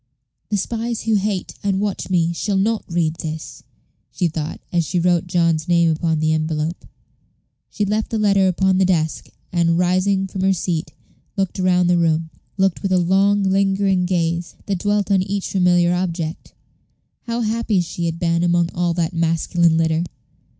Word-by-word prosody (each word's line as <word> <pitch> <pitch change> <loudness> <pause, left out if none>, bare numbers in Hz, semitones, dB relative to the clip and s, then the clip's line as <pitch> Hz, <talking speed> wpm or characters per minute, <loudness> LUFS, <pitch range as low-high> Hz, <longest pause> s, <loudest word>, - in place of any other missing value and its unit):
"The 210 - 0
spies 230 +3 -3
who 225 +1 0
hate 200 -2 -1
and 195 -1 0
watch 205 -2 -3
me 170 -2 +1
shall 200 +3 -1
not 215 +3 +1
read 165 -2 0
this," 160 -1 -6 0.5
she 180 - 0
thought, 160 -1 -4
as 170 -1 +2
she 175 +3 -1
wrote 175 0 +1
John's 170 -2 +1
name 170 -2 +3
upon 160 0 0
the 155 0 +1
envelope. 155 +1 -2 0.8
She 210 - -2
left 215 +2 -1
the 225 - -2
letter 200 -2 +3
upon 185 +1 +2
the - - +4
desk, 160 -4 -1 0.2
and, 170 -1 +2
rising 185 +2 +1
from 190 0 -5
her 190 0 +3
seat, 165 -4 -3 0.4
looked 195 -1 -1
round 180 -1 +3
the 175 -1 +3
room 160 -1 +1 0.3
looked 190 -2 +1
with 195 - -2
a 185 - +4
long, 195 +3 +3
lingering 195 -1 +1
gaze, 170 -1 -1
that 195 -3 -2
dwelt 205 0 0
on 195 -2 +4
each 195 +1 -3
familiar 175 -2 +3
object. 170 -3 -3 0.7
How 235 +1 -1
happy 225 -2 0
she 170 0 -2
had 165 0 -3
been 170 -1 +1
among 175 -1 +2
all 175 -1 0
that 170 0 -1
masculine 165 0 +2
litter! 160 0 +1
180 Hz, 170 wpm, -20 LUFS, 165-195 Hz, 0.8 s, the